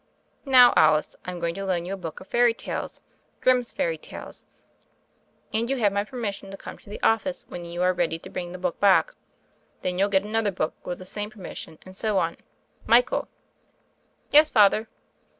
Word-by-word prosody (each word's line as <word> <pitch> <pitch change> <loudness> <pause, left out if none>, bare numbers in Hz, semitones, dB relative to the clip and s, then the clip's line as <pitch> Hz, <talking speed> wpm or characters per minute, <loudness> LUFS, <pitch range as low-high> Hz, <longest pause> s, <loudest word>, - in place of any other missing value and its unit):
"Now, 250 -2 +8
Alice, 155 -1 +4
Tm 180 -1 -5
going 170 0 -1
to 195 - -5
loan 180 -3 -1
you 190 - -4
a - - -1
book 165 -5 -7
of 185 - -13
fairy 240 -1 +3
tales - - -5 0.2
— - - -41
Grimm's 250 -2 +3
Fairy 165 -2 -1
Tales: - - -9 1.1
and 230 +2 0
you 270 - 0
have 205 -5 +2
my 200 0 +1
permission 210 -4 -5
to 195 - -8
come - - -10
to - - -17
the 205 - -7
office 265 +5 +1
when 175 -1 -7
you 170 +1 -3
are 185 0 +3
ready 170 -2 0
to - - -12
bring 175 -1 -5
the 180 - -7
book 180 -1 -3
back. 205 - +4 0.7
Then 180 0 -1
you'll 200 +1 +3
get 195 0 +2
another 220 0 0
book 165 -4 -2
with 175 - -3
the 185 - -11
same 205 +2 -4
permission 185 -6 -7
and 185 0 -12
so 210 0 0
on. 170 -2 0 0.5
Michael!" 245 +2 +3 1.0
"Yes, 305 +1 +7
Father." 215 -1 +4
195 Hz, 195 wpm, -25 LUFS, 175-225 Hz, 1.1 s, Now